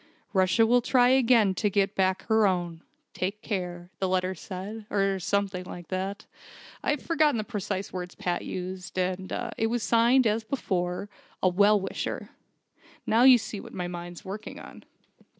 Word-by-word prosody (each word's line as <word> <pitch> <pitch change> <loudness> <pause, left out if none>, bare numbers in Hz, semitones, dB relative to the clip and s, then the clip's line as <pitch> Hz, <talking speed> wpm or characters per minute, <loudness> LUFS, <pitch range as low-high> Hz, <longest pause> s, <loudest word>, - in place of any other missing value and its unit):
'Russia 190 +4 +4
will 245 +2 +4
try 245 0 +4
again 240 -6 +4
to 205 +3 0
get 200 +1 +1
back 190 -1 +1
her 220 -2 +3
own. 175 -3 -2 0.3
Take 200 +3 -3
care,' 180 -3 -4
the 190 - +1
letter 185 0 +1
said 200 +4 -7
or 195 -1 +1
something 190 0 -1
like 175 -2 -9
that. 190 +2 -3 0.6
I've 295 -2 -1
forgotten 310 -5 +2
the 215 - -1
precise 200 -3 -4
words 180 -1 -5
Pat 175 -1 -2
used. 185 +1 -6
And 185 0 -1 0.3
it 225 - +2
was 235 0 -1
signed, 240 +3 +4
as 220 +1 +1
before: 185 -6 -2 0.4
'A 185 - +5
Well 205 +3 +4
Wisher'. 190 - -4 0.7
Now 225 +2 +3
you 255 0 +9
see 215 -2 -6
what - - -10
my 180 -2 -3
mind's 175 0 -8
working 200 +3 -7
on." - - -12
195 Hz, 165 wpm, -27 LUFS, 185-225 Hz, 0.7 s, you